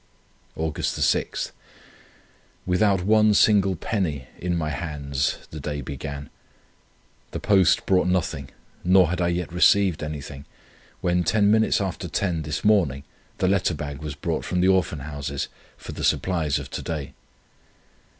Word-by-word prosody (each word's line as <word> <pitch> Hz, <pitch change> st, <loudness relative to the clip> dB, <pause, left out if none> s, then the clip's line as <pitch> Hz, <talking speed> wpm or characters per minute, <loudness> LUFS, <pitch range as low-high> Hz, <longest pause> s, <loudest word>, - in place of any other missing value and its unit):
"Aug. 80 Hz, -1 st, -3 dB
6. -, -, 0 dB, 1.1 s
Without 95 Hz, 0 st, +2 dB
one 105 Hz, +1 st, +4 dB
single 100 Hz, -3 st, +4 dB
penny 80 Hz, -, -2 dB
in 90 Hz, -1 st, -1 dB
my 75 Hz, -2 st, -1 dB
hands 70 Hz, -2 st, -2 dB
the 80 Hz, -, -7 dB
day 75 Hz, 0 st, -4 dB
began. 70 Hz, +1 st, -6 dB, 1.0 s
The -, -, -5 dB
post 95 Hz, -4 st, +3 dB
brought 90 Hz, -1 st, +3 dB
nothing, 85 Hz, -7 st, -1 dB, 0.3 s
nor 90 Hz, -1 st, +5 dB
had 90 Hz, -, -1 dB
I 85 Hz, -, +2 dB
yet 85 Hz, 0 st, -2 dB
received 95 Hz, -1 st, +4 dB
anything, 75 Hz, -2 st, -6 dB, 0.6 s
when 90 Hz, 0 st, +1 dB
ten 100 Hz, +4 st, +3 dB
minutes 110 Hz, 0 st, +3 dB
after 95 Hz, -3 st, -3 dB
ten 90 Hz, -5 st, -1 dB
this 75 Hz, +1 st, -4 dB
morning 85 Hz, -11 st, +3 dB, 0.3 s
the 95 Hz, -, +1 dB
letter 95 Hz, -3 st, +2 dB
bag 70 Hz, 0 st, -6 dB
was 75 Hz, -2 st, -5 dB
brought 80 Hz, +2 st, -2 dB
from 90 Hz, -, -1 dB
the 90 Hz, +1 st, +4 dB
Orphan 95 Hz, -6 st, +1 dB
Houses, 70 Hz, -1 st, -4 dB, 0.3 s
for -, -, -9 dB
the -, -, -6 dB
supplies 80 Hz, -6 st, +1 dB
of 65 Hz, -2 st, -7 dB
to -, -, -4 dB
day. 75 Hz, -5 st, -5 dB
85 Hz, 145 wpm, -24 LUFS, 75-95 Hz, 1.1 s, nor